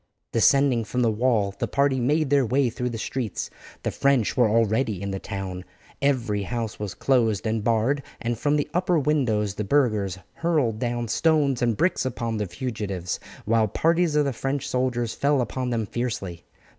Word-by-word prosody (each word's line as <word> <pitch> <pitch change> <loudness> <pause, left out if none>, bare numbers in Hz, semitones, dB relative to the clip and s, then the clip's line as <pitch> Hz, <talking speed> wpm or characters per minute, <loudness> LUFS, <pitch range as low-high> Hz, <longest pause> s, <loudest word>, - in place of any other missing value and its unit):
Descending 130 +1 +4
from 125 +3 -1
the 115 - +3
wall 110 -3 +1
the - - 0
party 140 -1 +1
made 145 +3 +1
their 140 -1 +5
way 130 +1 +1
through 125 +1 -2
the 115 - -5
streets. 115 -1 -3 0.3
The - - -1
French 140 -6 +2
were 120 -3 +4
already 110 -1 +1
in 100 +1 -4
the 95 - -3
town; 95 -3 -5 0.4
every 125 -7 +1
house 115 +1 -4
was 105 -3 -4
closed 115 -7 +1
and 110 -1 -1
barred, 115 +5 +1 0.2
and 120 0 -1
from 145 +6 +1
the 145 - 0
upper 180 -1 +2
windows 125 -9 +1
the 105 - -3
burghers 105 -7 +1 0.2
hurled 150 -10 0
down 120 -1 -2
stones 145 -1 +2
and 120 -3 +1
bricks 185 - +1
upon 115 -3 -2
the 105 -1 -2
fugitives, 100 -6 -4 0.3
while 110 0 +3
parties 165 - +1
of 150 -1 +3
the 140 - -1
French 135 +4 -2
soldiers 125 -2 -1
fell 145 0 +2
upon 125 +1 -2
them 115 -2 -1
fiercely. 100 -7 -4
120 Hz, 180 wpm, -25 LUFS, 110-140 Hz, 0.4 s, their